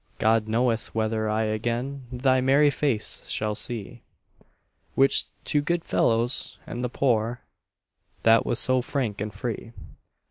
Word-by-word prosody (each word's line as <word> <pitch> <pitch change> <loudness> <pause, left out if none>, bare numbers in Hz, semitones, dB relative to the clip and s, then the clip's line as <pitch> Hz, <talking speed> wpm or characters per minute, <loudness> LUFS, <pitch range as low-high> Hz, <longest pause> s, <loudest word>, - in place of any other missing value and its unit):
God 110 0 +2
knoweth 115 0 0
whether 110 0 0
I 110 +1 +1
again 120 +5 -2
Thy 130 +1 +2
merry 140 +3 +4
face 135 -8 -2
shall 105 0 -1
see, 120 +1 -4 0.9
Which 135 0 +4 0.2
to 145 - +1
good 170 +3 -1
fellows 120 +3 0
and 120 +1 -5
the 125 - -1
poor 120 -2 0 0.8
That 115 0 +6
was 120 - -1
so 130 0 +3
frank 120 -6 -2
and 105 0 -3
free. 115 +2 -5
120 Hz, 135 wpm, -26 LUFS, 110-130 Hz, 0.9 s, That